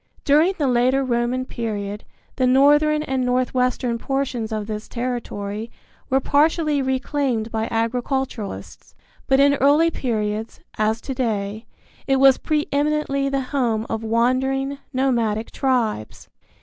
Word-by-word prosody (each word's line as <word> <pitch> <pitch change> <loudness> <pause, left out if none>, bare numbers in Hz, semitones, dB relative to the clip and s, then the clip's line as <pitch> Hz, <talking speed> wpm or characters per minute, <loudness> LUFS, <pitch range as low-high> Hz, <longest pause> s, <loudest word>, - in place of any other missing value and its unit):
During 310 +6 +4
the 295 - 0
later 255 +2 +2
Roman 245 +1 0
period 210 -4 -4 0.3
the 255 - +2
northern 295 +4 +4
and 265 -3 -1
northwestern 250 -1 0
portions 265 -4 -2
of 215 -1 -2
this 215 0 -5
territory 230 -3 -4 0.4
were 265 - +3
partially 300 +1 +2
reclaimed 260 -3 -1
by 220 0 -1
agriculturalists; 240 -1 -3 0.3
but 270 -1 +3
in 280 0 +5
early 300 +4 +4
periods, 220 -5 -3 0.2
as 220 +1 +1
to 270 - -5
day, 220 -4 -2 0.4
it 270 - +3
was 270 -1 +5
pre 305 -1 -1
eminently 285 -1 0
the 275 0 0
home 230 -5 0
of 225 0 -2
wandering, 265 +4 0
nomadic 235 -5 0
tribes. 235 - -1
255 Hz, 125 wpm, -22 LUFS, 225-275 Hz, 0.4 s, in